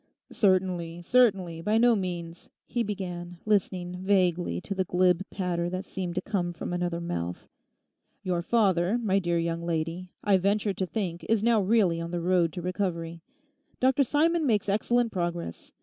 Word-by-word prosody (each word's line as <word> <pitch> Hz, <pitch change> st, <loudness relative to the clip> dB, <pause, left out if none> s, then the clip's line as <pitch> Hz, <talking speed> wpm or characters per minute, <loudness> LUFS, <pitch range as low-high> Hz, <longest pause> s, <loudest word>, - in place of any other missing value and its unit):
'Certainly, 180 Hz, -4 st, +1 dB
certainly, 190 Hz, -8 st, +2 dB
by 210 Hz, +6 st, +1 dB
no 235 Hz, 0 st, +5 dB
means,' 175 Hz, -3 st, -5 dB, 0.2 s
he 240 Hz, -, -2 dB
began, 180 Hz, -4 st, -4 dB
listening 185 Hz, -4 st, 0 dB
vaguely 180 Hz, -, +1 dB
to 195 Hz, -, -5 dB
the 190 Hz, -1 st, 0 dB
glib 180 Hz, 0 st, +2 dB
patter 175 Hz, -3 st, -2 dB
that 185 Hz, +2 st, -4 dB
seemed 180 Hz, -3 st, -5 dB
to 185 Hz, -, 0 dB
come 180 Hz, -5 st, -1 dB
from 170 Hz, -, -5 dB
another 175 Hz, -1 st, -1 dB
mouth. 85 Hz, -, -4 dB, 0.8 s
'Your 180 Hz, -2 st, 0 dB
father, 190 Hz, -1 st, +2 dB
my 200 Hz, -5 st, +1 dB
dear 175 Hz, -2 st, 0 dB
young 170 Hz, 0 st, -1 dB
lady, 170 Hz, +2 st, -2 dB
I 200 Hz, -2 st, +4 dB
venture 200 Hz, +2 st, +1 dB
to 190 Hz, -1 st, -2 dB
think 175 Hz, -5 st, -3 dB
is 220 Hz, -2 st, +2 dB
now 230 Hz, -2 st, +4 dB
really 190 Hz, -5 st, +2 dB
on 170 Hz, -, -4 dB
the 175 Hz, 0 st, -2 dB
road 175 Hz, -1 st, +2 dB
to 175 Hz, -, -6 dB
recovery. 170 Hz, -3 st, -3 dB, 0.6 s
Dr 265 Hz, +2 st, +4 dB
Simon 315 Hz, +4 st, +2 dB
makes 210 Hz, -5 st, +1 dB
excellent 230 Hz, +3 st, +1 dB
progress. 175 Hz, -, -4 dB
185 Hz, 165 wpm, -27 LUFS, 170-205 Hz, 0.8 s, no